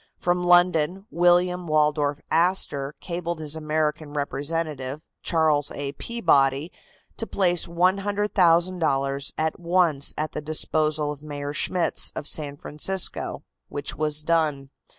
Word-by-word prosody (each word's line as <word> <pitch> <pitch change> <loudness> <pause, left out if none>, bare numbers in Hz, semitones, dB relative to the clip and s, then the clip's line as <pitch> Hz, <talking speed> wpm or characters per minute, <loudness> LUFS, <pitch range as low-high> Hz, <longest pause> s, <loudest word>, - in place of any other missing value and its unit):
From 180 0 0
London 175 +1 +3
William 175 +1 +2
Waldorf 150 -1 +1
Astor 160 -5 +1
cabled 170 -1 -4
his 155 -1 -4
American 155 -1 -2
representative, 145 -1 -3 0.2
Charles 155 -3 +2
A. 140 -1 -4
Peabody, 145 - +1 0.5
to 225 - -3
place 175 -3 +1
$100,000 175 -6 +1
at 160 0 -1
once 170 -5 +2
at 155 +1 -2
the - - -5
disposal 155 0 +1
of 145 -1 -8
Mayor 145 -1 -5
Schmitz, 175 +1 0
of 145 - -5
San 145 -2 0
Francisco, 180 +7 -2 0.3
which 145 0 -4
was 150 0 -1
done. 150 -4 0
155 Hz, 115 wpm, -24 LUFS, 145-175 Hz, 0.5 s, London